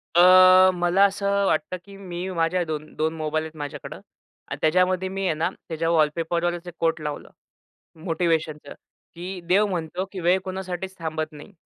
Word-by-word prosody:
अ, 175 Hz, -, +7 dB, 0.5 s
मला 175 Hz, +2 st, +2 dB
असं 200 Hz, 0 st, -2 dB
अ, 200 Hz, 0 st, +2 dB
वाटतं 155 Hz, +2 st, 0 dB
की 200 Hz, 0 st, -13 dB
मी 185 Hz, -1 st, -6 dB
माझ्या 175 Hz, +2 st, +1 dB
2 155 Hz, -1 st, -6 dB
2 160 Hz, +1 st, 0 dB
मोबाईल 155 Hz, 0 st, -1 dB
आहेत 160 Hz, -, -10 dB
माझ्याकडं 145 Hz, -2 st, -7 dB, 0.5 s
आणि -, -, -5 dB
त्याच्यामध्ये 185 Hz, +3 st, +2 dB
मी 195 Hz, 0 st, -3 dB
आहे 180 Hz, -, +2 dB
ना 160 Hz, +3 st, 0 dB, 0.2 s
त्याच्या 165 Hz, 0 st, -2 dB
वॉलपेपरवर 170 Hz, +2 st, +1 dB
असे 175 Hz, +1 st, -10 dB
कोट 165 Hz, -1 st, 0 dB
लावलं 150 Hz, -1 st, -5 dB, 0.8 s
मोटिव्हेशनचं, 160 Hz, -3 st, -1 dB, 0.4 s
की 180 Hz, +2 st, -6 dB
देव 200 Hz, +4 st, +4 dB
म्हणतो 180 Hz, -1 st, -3 dB
की 190 Hz, -, -5 dB
वेळ 180 Hz, +2 st, +3 dB
कोणासाठीच 190 Hz, 0 st, -5 dB
थांबत 160 Hz, -1 st, -4 dB
नाही. 150 Hz, +7 st, -12 dB
175 Hz, 165 wpm, -24 LUFS, 160-185 Hz, 0.8 s, अ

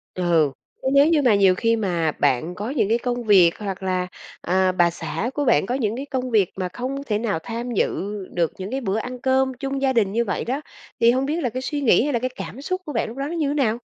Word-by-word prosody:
Ừ, 170 Hz, -5 st, +2 dB, 0.3 s
chứ -, -, -3 dB
nếu 280 Hz, +1 st, +6 dB
như 320 Hz, -3 st, +3 dB
mà 240 Hz, -6 st, +4 dB
nhiều 190 Hz, -2 st, +5 dB
khi 230 Hz, +3 st, +2 dB
mà 175 Hz, -7 st, 0 dB
bạn 160 Hz, +8 st, +1 dB
có 210 Hz, +5 st, -4 dB
những 255 Hz, -8 st, 0 dB
cái 230 Hz, -, +3 dB
công 245 Hz, 0 st, -3 dB
việc 185 Hz, -6 st, +5 dB
hoặc 195 Hz, -2 st, -5 dB
là, 185 Hz, -1 st, -1 dB, 0.3 s
à, 185 Hz, +1 st, +2 dB
bà 175 Hz, -1 st, +3 dB
xã 195 Hz, +6 st, -4 dB
của 290 Hz, -1 st, -1 dB
bạn 150 Hz, -, +3 dB
có 245 Hz, -, -1 dB
những 225 Hz, -4 st, -1 dB
cái 275 Hz, -, -4 dB
công 255 Hz, -3 st, -3 dB
việc 205 Hz, -5 st, +3 dB
mà 185 Hz, -1 st, -3 dB
không 265 Hz, +6 st, -4 dB
thể 210 Hz, -6 st, -1 dB
nào 210 Hz, -7 st, -1 dB
tham 235 Hz, +1 st, -4 dB
dự 205 Hz, -1 st, -1 dB, 0.2 s
được 170 Hz, -2 st, +1 dB
những 190 Hz, +4 st, -6 dB
cái 270 Hz, +1 st, -2 dB
bữa 205 Hz, -1 st, -1 dB
ăn 250 Hz, +2 st, -5 dB
cơm 265 Hz, 0 st, +2 dB
chung 270 Hz, +2 st, -4 dB
gia 265 Hz, -1 st, +2 dB
đình 205 Hz, -5 st, +2 dB
như 235 Hz, +2 st, +1 dB
vậy 200 Hz, -, -2 dB
đó, 265 Hz, +5 st, -2 dB, 0.4 s
thì 230 Hz, +1 st, +6 dB
hông 260 Hz, +2 st, 0 dB
biết 315 Hz, +4 st, -1 dB
là 245 Hz, -, +1 dB
cái 255 Hz, +3 st, -4 dB
suy 290 Hz, +1 st, -3 dB
nghĩ 235 Hz, -4 st, +4 dB
hay 290 Hz, -, -1 dB
là 235 Hz, -, +1 dB
cái 255 Hz, +1 st, -1 dB
cảm 270 Hz, -, -7 dB
xúc 370 Hz, +5 st, -3 dB
của 295 Hz, -, -6 dB
bạn 225 Hz, -, 0 dB
lúc 240 Hz, -, -10 dB
đó 275 Hz, -, -2 dB
nó 330 Hz, -, -5 dB
như 290 Hz, -3 st, 0 dB
nào? 235 Hz, -6 st, +1 dB
230 Hz, 270 wpm, -23 LUFS, 190-265 Hz, 0.4 s, nếu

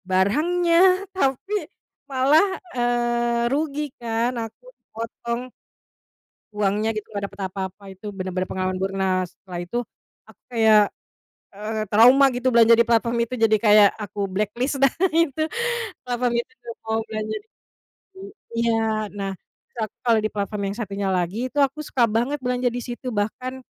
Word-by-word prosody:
Barangnya, 310 Hz, -, +2 dB, 0.4 s
tapi 325 Hz, +3 st, -1 dB, 0.6 s
malah, 275 Hz, +6 st, +4 dB, 0.3 s
eee, 240 Hz, -1 st, +1 dB
rugi 295 Hz, 0 st, -1 dB, 0.2 s
kan, 230 Hz, 0 st, 0 dB
aku 225 Hz, -, -10 dB
kepotong 235 Hz, +1 st, -5 dB, 1.1 s
uangnya 210 Hz, +1 st, 0 dB
gitu, 215 Hz, -1 st, -5 dB
nggak 200 Hz, -, -2 dB
dapet 200 Hz, 0 st, -10 dB
apa-apa, 190 Hz, +1 st, -6 dB
itu 190 Hz, -, -15 dB
bener-bener 185 Hz, -1 st, -3 dB
pengalaman 185 Hz, 0 st, -2 dB
buruk. 190 Hz, +1 st, -2 dB
Nah 185 Hz, -1 st, +1 dB
setelah 180 Hz, 0 st, -9 dB
itu 175 Hz, +7 st, -4 dB, 0.5 s
aku -, -, -19 dB
kayak, 220 Hz, -3 st, +5 dB, 0.6 s
eee, 215 Hz, +2 st, -3 dB
trauma 245 Hz, +7 st, +7 dB
gitu 250 Hz, +1 st, +1 dB
belanja 230 Hz, -1 st, +6 dB
di 230 Hz, -, +5 dB
platform 235 Hz, 0 st, +1 dB
itu, 235 Hz, +2 st, -3 dB
jadi 220 Hz, -1 st, +4 dB
kayak 210 Hz, -2 st, +7 dB
aku 205 Hz, -1 st, -4 dB
blacklist 215 Hz, +8 st, -2 dB
dah 275 Hz, -, +6 dB, 0.2 s
itu, 320 Hz, -3 st, +2 dB, 0.6 s
platform 245 Hz, -1 st, -1 dB
itu, -, -, -23 dB, 0.2 s
nggak 230 Hz, -1 st, -6 dB
mau 220 Hz, 0 st, -1 dB
belanja 215 Hz, -1 st, -4 dB
di -, -, -41 dB, 0.7 s
di -, -, -11 dB, 0.4 s
iya. 230 Hz, -, +3 dB, 0.4 s
Nah, 200 Hz, -1 st, -4 dB
terus -, -, -47 dB, 0.2 s
aku -, -, -73 dB
kalo 235 Hz, -2 st, +4 dB
di 215 Hz, -, 0 dB
platform 205 Hz, 0 st, -3 dB
yang -, -, -8 dB
satunya 200 Hz, -2 st, -3 dB
lagi, 180 Hz, +2 st, -1 dB
itu 290 Hz, -, -4 dB
aku 275 Hz, +1 st, +2 dB
suka 245 Hz, -5 st, +2 dB
banget 240 Hz, +7 st, 0 dB
belanja 250 Hz, 0 st, 0 dB
di 245 Hz, -, -3 dB
situ 245 Hz, +1 st, -6 dB
bahkan 250 Hz, +5 st, -3 dB
225 Hz, 150 wpm, -23 LUFS, 205-250 Hz, 1.1 s, trauma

